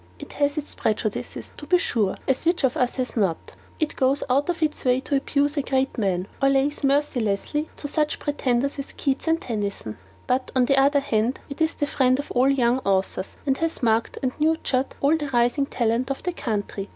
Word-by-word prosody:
It - - -10
has 285 +1 0
its 295 - -4
prejudices, 215 -1 -3
to 295 - -10
be 360 +3 +5
sure, 215 - 0
as 265 - +1
which 340 -1 +1
of 265 -1 +2
us 250 -1 0
has 255 -1 -3
not? 195 -8 -1 0.3
It 310 -2 -1
goes 270 +1 +1
out 280 +6 +2
of 335 -2 0
its 305 -1 -1
way 250 0 +3
to 285 - -1
abuse 285 +2 0
a - - +3
great 265 0 0
man, 190 -4 0
or 275 - +5
lays 275 +2 +1
mercilessly 275 -1 +1
on - - -24
to 290 - -6
such 300 +1 0
pretenders 280 -2 -1
as 275 - -6
Keats 275 +3 -2
and 325 0 +3
Tennyson; 205 - -4 0.3
but, 255 +1 0
on 255 -1 +4
the 275 +2 +3
other 280 +1 +4
hand, 235 -1 0
it 280 - -7
is 320 0 +2
the 290 - 0
friend 260 -3 +2
of 285 - -5
all 255 +2 +3
young 250 -2 +2
authors, 195 -3 -1
and 270 -1 +1
has 330 -4 -2
marked 225 0 +1
and 255 - +1
nurtured 300 -4 +1
all 285 +3 +4
the 295 -3 -3
rising 245 +3 +2
talent 240 +1 0
of 275 - -3
the 360 - -1
country. 205 -7 -3
270 Hz, 210 wpm, -24 LUFS, 240-290 Hz, 0.3 s, be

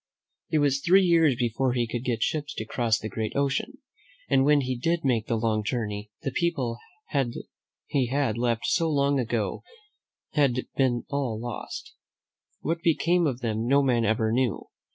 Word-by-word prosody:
It 155 - +2
was 140 -2 +2
three 190 +5 +5
years 165 -6 +4
before 120 +2 0
he 120 -1 +1
could 120 +1 -4
get 120 -3 0
ships 150 -1 -2
to 110 - -4
cross 115 0 +1
the 110 - -5
great 110 +1 -4
ocean, 140 0 0 0.5
and 135 - +3
when 145 +1 +4
he 130 -1 -2
did 165 +7 0
make 115 -4 +1
the 115 - 0
long 110 -1 0
journey, 105 -2 -3
the 135 - -1
people 130 -8 -1 1.1
he 135 -3 +1
had 135 -3 0
left 120 -1 0
so 165 -2 +2
long 140 -2 +2
ago 115 -5 -1 0.7
had 140 -5 +2
all 125 - -1
been 125 -3 +1
lost. 120 -5 -4 0.7
What 165 +2 -2
became 170 0 +2
of 130 -2 -3
them 115 -1 -1
no 140 +2 +4
man 120 -3 +2
ever 110 0 +1
knew. 125 -1 0
125 Hz, 170 wpm, -26 LUFS, 115-145 Hz, 1.1 s, three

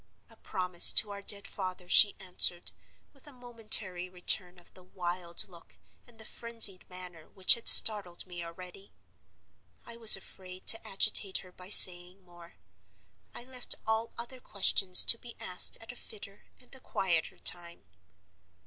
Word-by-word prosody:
'A - - -15
promise 180 -2 +2
to 210 - -2
our 200 0 -13
dead 200 0 +1
father,' 185 -2 -10
she 205 +3 +3
answered, 180 -2 -4 0.4
with 275 0 -23
a - - -15
momentary 220 -7 -2
return 180 0 -1
of 175 - -21
the 185 - -19
wild 175 -1 -6
look 170 -3 -21 0.3
and 240 -2 -25
the 220 - -14
frenzied 230 -6 -1
manner 180 -3 -14
which 190 -2 +1
had 235 - -5
startled 200 -6 +5
me 175 -2 -13
already. 180 +3 -15 0.9
I 235 - -14
was 225 -4 +7
afraid 185 -1 -17
to 225 - +2
agitate 195 0 -2
her 180 - -21
by 180 +1 -15
saying 180 -1 +3
more; 175 -1 -22 0.8
I - - -12
left 250 -1 -3
all 220 +1 -7
other 240 +2 -12
questions 195 -4 +2
to 230 - +1
be 240 -1 -16
asked 180 - -3
at 225 +2 -15
a - - -19
fitter 200 -4 -14
and 250 +1 -16
a 265 - -7
quieter 175 -9 -6
time. 170 -1 -1
190 Hz, 160 wpm, -25 LUFS, 180-225 Hz, 0.9 s, was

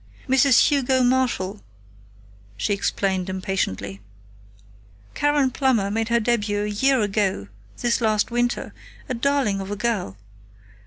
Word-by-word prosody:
"Mrs. 265 -1 +5
Hugo 265 -3 +2
Marshall," 245 -6 0 1.0
she 110 - 0
explained 190 -2 -1
impatiently. 185 - -3 1.1
"Karen 290 -2 +1
Plummer 235 -7 +1
made 225 +2 -1
her 235 0 +3
debut 210 -3 0
a 210 - -2
year 260 +5 +2
ago 195 - -1 0.3
this 240 +1 +1
last 215 0 +1
winter 240 0 -1 0.3
a 255 - -2
darling 250 -5 0
of 190 - -7
a 205 - -3
girl. 210 - -2
220 Hz, 120 wpm, -23 LUFS, 195-255 Hz, 1.1 s, Mrs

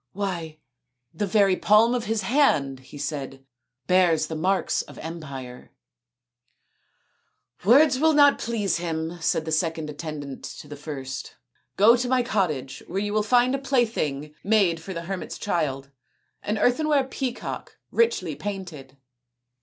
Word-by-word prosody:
" - - -58
Why 165 -5 -4 0.6
the 205 - -2
very 195 -1 +4
palm 215 +5 +4
of 245 -1 -1
his 220 0 -1
hand/' 145 - +2
he 130 +3 -13
said, 135 -2 -5 0.2
" 125 +2 -59
bears 175 -2 +3
the 160 - -5
marks 185 +5 +1
of - - -13
empire." 140 -7 -8 0.9
" 125 +8 -32
Words 265 +4 +6
will 320 +1 +4
not 285 -1 +6
please 210 -6 -1
him/' 165 0 -4
said 160 -1 0
the 160 - -4
second 160 -1 -1
attendant 145 -3 -7
to - - -8
the 145 - -8
first. 135 -3 -7 0.2
" 130 - -44
Go 220 +4 +7
to 245 0 -2
my 255 -1 +3
cottage, 155 - -1
where 185 - -5
you 205 +1 -1
will 215 - +2
find 245 +4 +3
a 275 - 0
plaything 220 - -1
made 195 -6 +3
for 175 +4 -8
the 170 -2 -5
hermit's 185 -1 -5
child 140 -8 -2 0.5
an 210 +1 -2
earthenware 285 +5 +2
peacock 260 -1 -5
richly 465 0 +1
painted." 175 -10 -7
175 Hz, 155 wpm, -25 LUFS, 150-225 Hz, 0.9 s, Go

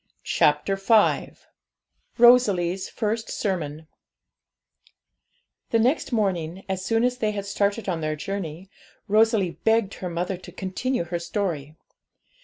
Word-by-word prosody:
] - - -42
CHAPTER 150 +7 +2
V 210 +2 +3 0.8
ROSALIE'S 200 -7 +4
FIRST 225 0 -2
SERMON 160 -6 -3 1.8
The 230 - +2
next 255 +8 +1
morning, 190 -5 -1
as 190 -1 -3
soon 225 +3 +1
as 250 0 0
they 215 - +1
had 200 -1 -4
started 200 +2 -1
on 170 -4 -1
their 155 0 -1
journey, 185 0 -6 0.4
Rosalie 215 -4 +2
begged 225 -3 +2
her 180 - -5
mother 175 +2 -2
to 175 0 -12
continue 190 +6 -2
her 170 0 -4
story. 170 -5 -3
195 Hz, 125 wpm, -24 LUFS, 175-220 Hz, 1.8 s, ROSALIE'S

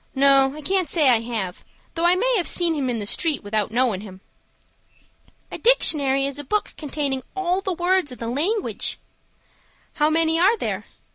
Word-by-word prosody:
No, 275 0 +4
I 305 - -8
can't 370 0 0
say 305 -5 +3
I 235 - +3
have, 220 -6 -5 0.3
though 335 0 -1
I 355 - +4
may - - +1
have 355 - 0
seen 345 -2 +2
him 280 -4 -2
in 240 - -2
the 210 - -4
street 305 - -1
without 205 0 -1
knowin' 230 -4 0
him." 190 -3 -11 1.3
"A - - -6
dictionary 280 - +3
is 280 +1 -3
a - - -4
book 420 +9 -2
containing 280 -3 -3
all 375 0 -1
the 385 -1 -3
words 355 -3 0
in 250 - -9
the 230 - -6
language." 340 - -2 1.0
"How 300 0 +1
many 325 +1 +1
are 400 +6 +4
there?" - - -4
295 Hz, 185 wpm, -22 LUFS, 255-355 Hz, 1.3 s, No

